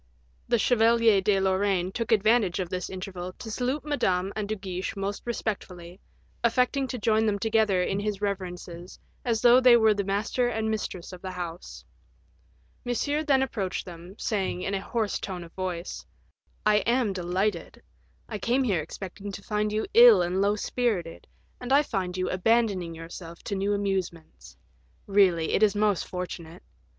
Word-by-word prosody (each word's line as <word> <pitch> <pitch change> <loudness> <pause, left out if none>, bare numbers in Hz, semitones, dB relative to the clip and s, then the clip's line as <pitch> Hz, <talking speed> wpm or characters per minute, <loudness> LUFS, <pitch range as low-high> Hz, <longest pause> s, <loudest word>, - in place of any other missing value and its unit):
The 240 - +3
Chevalier 230 -2 +4
de 195 0 +2
Lorraine 190 -1 +1
took 230 +3 -3
advantage 215 -3 +3
of 180 -2 -2
this 180 0 -4
interval 185 -1 -6
to 220 - -8
salute 255 +6 -2
Madame 190 -10 0
and 210 -1 -3
De 215 - 0
Guiche 190 0 -5
most 200 +1 -3
respectfully, 185 -6 -5 0.4
affecting 250 +3 +2
to 255 - -4
join 220 0 +2
them 205 -1 +1
together 215 -4 +2
in 195 +2 -1
his 205 -1 -2
reverences 180 -3 -5 0.3
as 230 -3 -1
though 245 +1 +7
they 250 -2 +7
were 220 -2 +4
the 200 -1 -2
master 205 +5 0
and 220 -2 -1
mistress 190 -4 -4
of 180 - -10
the 190 - -5
house. 175 -2 -7 1.0
Monsieur 285 +4 -1
then 275 -3 +3
approached 195 -8 -3
them, 175 +1 -11
saying, 190 -4 -2
in 195 - -2
a 195 - -1
hoarse 220 0 -2
tone 180 -3 -5
of 165 - -14
voice, 185 -2 -4 0.6
"I 210 0 +5
am 235 -1 +1
delighted; 180 +1 -2 0.4
I 215 -3 -5
came 245 +6 +1
here 195 -10 +1
expecting 195 +5 -7
to 195 - -8
find 210 0 -1
you 215 +1 -1
ill 235 -6 +8
and 180 +2 0
low 200 +1 +2
spirited, 210 -7 -2 0.3
and 250 +1 -6
I 285 +2 +6
find 185 -8 -3
you 185 - -1
abandoning 190 -3 +1
yourself 165 +1 -10
to 200 - -3
new 195 +1 0
amusements; 190 -5 -4 0.5
really, 190 -5 +3
it - - +2
is 210 -1 +4
most 205 -3 +1
fortunate. 180 -1 -7
200 Hz, 165 wpm, -27 LUFS, 185-225 Hz, 1.0 s, ill